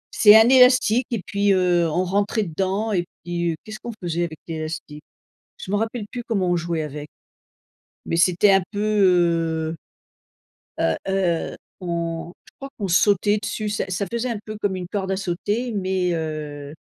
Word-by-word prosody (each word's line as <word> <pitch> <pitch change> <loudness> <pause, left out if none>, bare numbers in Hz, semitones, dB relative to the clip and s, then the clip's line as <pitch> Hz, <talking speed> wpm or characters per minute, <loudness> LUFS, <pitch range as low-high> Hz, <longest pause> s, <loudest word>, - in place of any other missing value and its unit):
C'est 210 0 +8
un 225 - +6
élastique 250 -2 +5
et 225 -5 -1
puis, 200 0 +1
heu, 175 -3 +2
on 180 +4 0
rentrait 205 +3 0
dedans 195 +5 -2
et 175 -2 0 0.2
puis 170 -1 -2
qu'est-ce 215 0 -8
qu'on 235 - -6
faisait 175 0 -1
avec 160 -2 -8
l'élastique? 155 -2 -6 0.5
Je 190 - -7
m'en 205 - +2
rappelle 225 0 -3
plus 245 -1 -4
comment 195 -6 0
on 175 - +2
jouait 170 -1 -2
avec, 150 0 -7 1.0
mais 165 - -1
c'était 180 +3 +4
un 195 0 +5
peu, 205 - -3 0.9
heu 160 - -5 1.0
heu 80 -1 +2
heu, 185 -4 0 0.3
on 170 -1 -3
je - - -21
crois 275 - -9
qu'on 200 - -2
sautait 205 +3 +3
dessus 215 0 -3
ça 205 - -2
ça 185 +2 -1
faisait 235 +2 -2
un 225 -3 -3
peu 215 -1 -6
comme 205 -2 -1
une 180 -1 -5
corde 195 -1 -3
à 190 - 0
sauter, 205 +6 -2
mais 185 -3 0
heu 150 -2 -5
185 Hz, 175 wpm, -22 LUFS, 170-210 Hz, 1.0 s, C'est